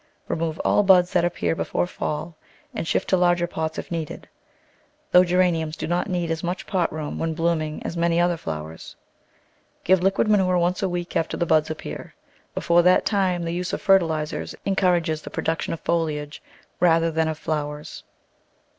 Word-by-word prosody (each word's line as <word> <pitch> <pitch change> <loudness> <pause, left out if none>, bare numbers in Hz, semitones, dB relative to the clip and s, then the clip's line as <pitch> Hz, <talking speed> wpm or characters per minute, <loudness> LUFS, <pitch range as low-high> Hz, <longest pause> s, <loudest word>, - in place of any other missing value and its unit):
Remove 160 -1 -2
all - - +4
buds 185 -2 +5
that 175 -2 +3
ap 175 - 0
pear - - 0
before 165 - -1
fall 155 -1 -4 0.4
and 215 -8 -4
shift - - 0
to - - +3
larger 175 -1 +3
pots 160 -2 -4
if - - -6
needed, 165 -3 -5 0.8
though 180 - +7
Geraniums 175 -3 +1
do - - -4
not 175 +4 -1
need 175 -2 -1
as 160 -1 -3
much 175 +2 -3
pot 180 -4 0
room 155 -1 -5
when 165 -1 -1
blooming 160 -2 -1
as - - -4
many 170 0 +1
other 175 0 +2
flowers. 80 - -7 0.9
Give 185 0 +4
liquid 195 +3 +2
manure 190 -4 +3
once 175 +1 +1
a 190 - 0
week 175 0 -4
after 165 - 0
the 170 - 0
buds 155 -2 +2
appear 155 - -7 0.2
— - - -35
before 170 0 +3
that 180 +1 +4
time 185 -4 +1
the 165 0 -3
use 180 +1 -3
of - - -2
fertilisers 165 -6 +1
encourages 175 -5 +1
the - - -8
produc 165 0 -2
tion - - -3
of - - -13
foliage 150 -3 -2 0.4
rather 165 -1 +3
than 160 0 +1
of 160 -1 -3
flowers. 150 -1 -4
170 Hz, 185 wpm, -23 LUFS, 160-180 Hz, 0.9 s, though